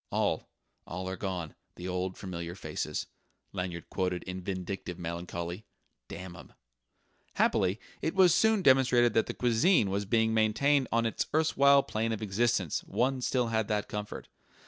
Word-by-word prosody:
"'All, -, -, 0 dB, 0.4 s
all 95 Hz, +2 st, -5 dB
are 95 Hz, -, -3 dB
gone, 90 Hz, -5 st, -4 dB, 0.2 s
the 90 Hz, -, -7 dB
old 90 Hz, 0 st, -2 dB
familiar 85 Hz, -2 st, -6 dB
faces,'" -, -, -4 dB, 0.5 s
Lanyard 90 Hz, -3 st, -4 dB
quoted 90 Hz, -2 st, -1 dB
in 95 Hz, 0 st, -6 dB
vindictive 95 Hz, -1 st, -4 dB
melancholy 85 Hz, +2 st, -5 dB, 0.4 s
"damn 90 Hz, 0 st, -8 dB
'em!" -, -, -13 dB, 0.8 s
Happily, 95 Hz, +3 st, +2 dB, 0.2 s
it 160 Hz, -, -1 dB
was 185 Hz, -3 st, +6 dB
soon 220 Hz, -3 st, +3 dB
demonstrated 125 Hz, -4 st, +5 dB
that 115 Hz, -, +2 dB
the -, -, -4 dB
cuisine 120 Hz, -, +3 dB
was 100 Hz, +1 st, -1 dB
being 110 Hz, +1 st, +2 dB
maintained 130 Hz, +6 st, +3 dB
on 115 Hz, 0 st, +2 dB
its 115 Hz, -, -1 dB
erstwhile 140 Hz, -3 st, +5 dB
plane 115 Hz, +1 st, -2 dB
of 110 Hz, -, -2 dB
excellence: 105 Hz, -4 st, 0 dB
one 130 Hz, +1 st, 0 dB
still 125 Hz, -1 st, +1 dB
had 110 Hz, -2 st, 0 dB
that 105 Hz, -1 st, -1 dB
comfort.... 105 Hz, 0 st, -6 dB
105 Hz, 150 wpm, -30 LUFS, 90-120 Hz, 0.8 s, was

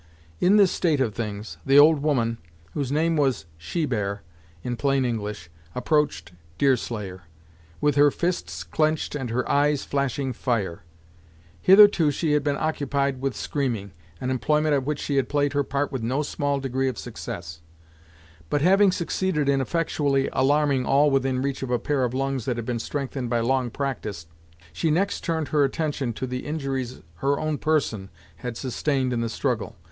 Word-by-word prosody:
In 195 Hz, +4 st, +5 dB
this 200 Hz, -3 st, +5 dB
state 160 Hz, -5 st, +1 dB
of 120 Hz, -6 st, +1 dB
things, 105 Hz, -1 st, -5 dB
the 135 Hz, +1 st, +4 dB
old 150 Hz, 0 st, +7 dB
woman, 120 Hz, -6 st, 0 dB, 0.3 s
whose 140 Hz, -3 st, -2 dB
name 160 Hz, +3 st, +2 dB
was 135 Hz, -, +1 dB
Shebear, 105 Hz, -, -2 dB, 0.4 s
in 125 Hz, -, -2 dB
plain 135 Hz, +1 st, +1 dB
English, 105 Hz, -6 st, -4 dB, 0.2 s
approached 125 Hz, -, 0 dB, 0.3 s
Deerslayer, 105 Hz, -, -1 dB, 0.5 s
with 150 Hz, 0 st, +2 dB
her 145 Hz, 0 st, +7 dB
fists 175 Hz, +5 st, -2 dB
clenched 155 Hz, 0 st, 0 dB
and 135 Hz, -5 st, -3 dB
her 120 Hz, +2 st, -1 dB
eyes 145 Hz, 0 st, +2 dB
flashing 140 Hz, -1 st, -1 dB
fire. 110 Hz, -8 st, -2 dB, 0.8 s
Hitherto, 195 Hz, -5 st, +7 dB
she 150 Hz, +2 st, -1 dB
had 150 Hz, -1 st, +2 dB
been 145 Hz, -1 st, 0 dB
occupied 140 Hz, -3 st, -1 dB
with 135 Hz, -1 st, -1 dB
screaming, 120 Hz, -9 st, -2 dB, 0.3 s
an 130 Hz, -, -2 dB
employment 150 Hz, +5 st, +1 dB
at 135 Hz, -2 st, +1 dB
which 150 Hz, 0 st, -1 dB
she 140 Hz, -1 st, -2 dB
had 135 Hz, -3 st, +1 dB
played 145 Hz, -1 st, +1 dB
her 145 Hz, 0 st, +2 dB
part 140 Hz, +2 st, -2 dB
with 130 Hz, -4 st, -3 dB
no 130 Hz, +6 st, 0 dB
small 145 Hz, -1 st, -1 dB
degree 135 Hz, 0 st, -1 dB
of 130 Hz, -, -2 dB
success, 85 Hz, -8 st, -7 dB, 0.9 s
but 145 Hz, -, +1 dB
having 195 Hz, +2 st, +5 dB
succeeded 170 Hz, -4 st, -1 dB
in 140 Hz, -1 st, +3 dB
effectually 140 Hz, -2 st, 0 dB
alarming 140 Hz, 0 st, +2 dB
all 145 Hz, +3 st, +4 dB
within 135 Hz, -1 st, +1 dB
reach 140 Hz, -1 st, -2 dB
of 135 Hz, -, -4 dB
a 125 Hz, -, +2 dB
pair 140 Hz, +2 st, 0 dB
of 125 Hz, 0 st, -1 dB
lungs 135 Hz, -2 st, -1 dB
that 125 Hz, -3 st, -1 dB
had 120 Hz, -, -4 dB
been 120 Hz, -1 st, -2 dB
strengthened 135 Hz, -1 st, -4 dB
by 120 Hz, -1 st, +1 dB
long 125 Hz, +1 st, +1 dB
practice, 110 Hz, -, -4 dB, 0.5 s
she 160 Hz, -, 0 dB
next 190 Hz, +6 st, 0 dB
turned 160 Hz, -3 st, -1 dB
her 150 Hz, -2 st, +3 dB
attention 140 Hz, -2 st, -1 dB
to 115 Hz, -, -4 dB
the 125 Hz, 0 st, -4 dB
injuries 135 Hz, -5 st, -3 dB, 0.2 s
her 140 Hz, +8 st, 0 dB
own 155 Hz, -1 st, -2 dB
person 125 Hz, -11 st, 0 dB, 0.3 s
had 120 Hz, +4 st, -5 dB
sustained 130 Hz, 0 st, -1 dB
in 120 Hz, -, -1 dB
the 115 Hz, -, -1 dB
struggle. -, -, -2 dB
135 Hz, 170 wpm, -25 LUFS, 120-150 Hz, 0.9 s, old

